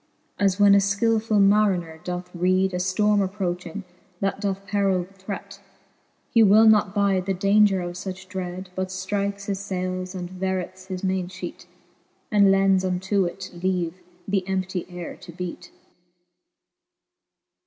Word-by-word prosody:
As 195 -1 +2
when 205 -1 +7
a 200 - +7
{killfull 215 +2 +1
mariner 195 -5 +3
doth 180 0 -5
reed 185 +2 +2
A - - 0
ftorme 200 +3 +2
approching, 185 -1 -3 0.4
that 195 0 -1
doth 195 -1 -2
perill 195 -2 +1
threat, 195 +1 -8 0.7
He 230 - +5
will 215 +1 +7
not 210 -2 +4
bide 195 -2 +1
the 195 - +1
idaunger 200 0 +4
of 175 - -6
fuch 190 +1 -7
dread, 185 0 -6
But 185 0 -2
ftrikes 200 +2 -3
his 195 -2 -2
fayles, 185 -1 -3
and 180 -1 -4
vereth 185 0 -4
his 185 -1 -5
mainfheat, 185 -1 -4 0.6
And 200 -2 +5
lends 195 -1 +4
unto 190 +1 0
it 175 - -6
leave 185 -1 -1 0.3
the 195 -1 +1
emptie 190 -1 -2
ayre 175 -1 -7
to - - -11
beat: 180 +1 -6
XIX. - - -18
190 Hz, 145 wpm, -24 LUFS, 185-200 Hz, 0.7 s, when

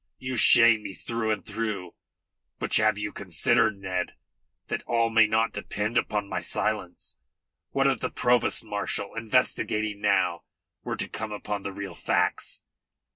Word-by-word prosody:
You 130 0 -4
shame 115 -1 +7
me 100 -2 -7
through 115 -1 -3
and 105 -2 -1
through. 105 -6 -4 0.6
But - - -4
have 110 -1 +3
you 105 0 -4
considered, 100 +2 +2
Ned, 95 -2 -3 0.5
that - - -3
all 115 -1 +1
may 110 -1 +6
not 110 +1 +1
depend 105 +2 -3
upon 105 -3 0
my - - -3
silence? 105 -3 -3 0.5
What 135 0 +1
if 135 -4 +2
the - - -2
provost 125 -2 +2
marshal, 100 -1 -3
investigating 110 -2 0
now, 95 -4 +2 0.4
were - - -4
to - - -1
come 110 -1 -6
upon 105 -1 -4
the 100 - -5
real 100 0 -6
facts?" - - -1
105 Hz, 150 wpm, -26 LUFS, 100-115 Hz, 0.6 s, shame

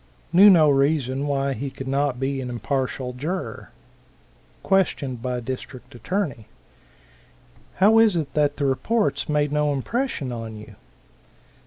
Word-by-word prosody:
Knew 195 +4 +8
no 165 -5 +6
reason 140 -1 +1
why 140 -1 0
he 140 +1 -4
could 135 0 -9
not 135 -1 0
be 135 0 -2
an 125 - -5
impartial 130 +1 -3
juror. 160 +9 -5 0.9
Question 175 -9 +1
by 125 +1 -3
District 130 +1 -7
Attorney. 135 - -3 1.3
"How 215 +4 +5
is 220 -4 +4
it 155 -4 -3
that 145 -1 +1
the 145 - -1
reports 205 - 0
made 150 -1 +1
no 150 0 +1
impression 145 - -2
on 115 -2 -6
you?" 105 - -12
140 Hz, 135 wpm, -23 LUFS, 130-160 Hz, 1.3 s, Knew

